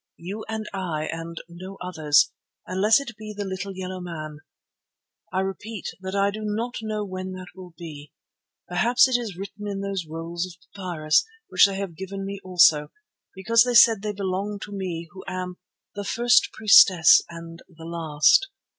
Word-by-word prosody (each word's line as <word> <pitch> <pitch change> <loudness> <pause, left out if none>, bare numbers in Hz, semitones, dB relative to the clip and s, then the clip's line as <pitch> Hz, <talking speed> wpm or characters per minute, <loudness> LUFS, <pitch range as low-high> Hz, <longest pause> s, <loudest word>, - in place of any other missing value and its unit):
You 195 +6 -7
and 220 -1 -3
I 170 -5 -3
and 165 0 -7
no 185 +3 -10
others—unless 180 - +1
it 265 -5 -8
be 215 -1 -8
the 205 - -3
little 190 0 -5
yellow 185 0 -5
man. 155 -4 -7 0.9
I 190 - 0
repeat 195 +2 -5
that 190 +1 -5
I 200 0 +2
do 215 - -7
not 225 +4 -3
know 215 -1 -3
when 185 -1 -6
that 185 -1 -9
will 180 -2 -12
be. 150 -4 -10 0.6
Perhaps 225 +9 +4
it 260 - 0
is 225 -7 -2
written 200 +2 -7
in 200 -1 -4
those 195 -4 -3
rolls 165 +2 -4
of 180 - -12 0.2
papyrus, 170 -6 +1 0.3
which 185 +2 +6
they 195 - -4
have 195 -4 -5
given 195 +3 -6
me 200 0 -5
also, 170 -5 +4 0.5
because 230 +5 +3
they 245 -1 -1
said 225 -3 +7
they 210 0 -2
belonged 200 +1 -3
to 205 - -9
me 175 -4 -4
who 190 - -11
am 180 -1 -5 0.4
'the 205 -1 -6
first 240 +4 +3
priestess 185 -5 +7
and 165 0 -10
the 165 -2 -13
last. 165 - +3
190 Hz, 170 wpm, -24 LUFS, 170-205 Hz, 0.9 s, said